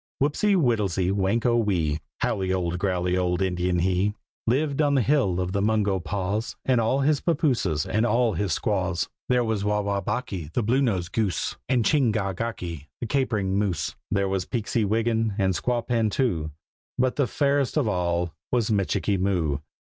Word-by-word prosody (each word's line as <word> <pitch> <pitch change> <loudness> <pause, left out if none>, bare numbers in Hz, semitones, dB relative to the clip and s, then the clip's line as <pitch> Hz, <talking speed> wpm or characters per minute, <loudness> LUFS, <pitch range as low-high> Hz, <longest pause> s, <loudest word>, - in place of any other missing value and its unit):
Whopsy 175 +9 +2
Whittlesy 105 - +1
Whanko 105 +5 +1
Whee, 80 -7 0 0.2
Howly 95 -1 0
old 90 -2 -1
growly 90 -2 0
old 90 -1 0
Indian 90 -1 0
he, 95 +4 +1 0.3
Lived 140 +4 +1
on 145 -1 +3
the 130 - +3
hill 120 -10 +2
of 90 0 -1
the 100 +1 0
Mungo 105 -2 +1
Paws, 100 +4 -2
With 130 -2 +4
all 115 +5 +1
his 145 +1 +2
pappooses 125 - +1
and 110 - 0
all 120 -1 +2
his 100 -4 -1
squaws. 95 -1 0 0.2
There 125 -1 +3
was 110 -3 -1
Wah 105 0 +1
wah 100 -1 -1
bocky, 90 -6 -3
the 120 - 0
Blue 125 +6 +2
nosed 95 -9 0
Goose, 105 -5 -1
And 125 -4 +2
Ching 140 -7 +3
gach 100 -4 -2
gocky, 85 -10 -4
the - - -3
Capering 110 -7 0
Moose; 90 -7 -1
There 100 -1 +1
was 95 -2 -2
Peeksy 115 -1 -1
Wiggin, 115 0 +1
and 95 -2 +2
Squawpan 115 +1 0
too, 90 - 0 0.5
But 130 0 +1
the 140 -3 +2
fairest 140 0 +1
of 140 -7 +2
all 85 -3 0 0.2
was 120 -3 +1
Michikee 100 -1 +1
Moo. 85 -7 0
105 Hz, 170 wpm, -25 LUFS, 90-120 Hz, 0.5 s, With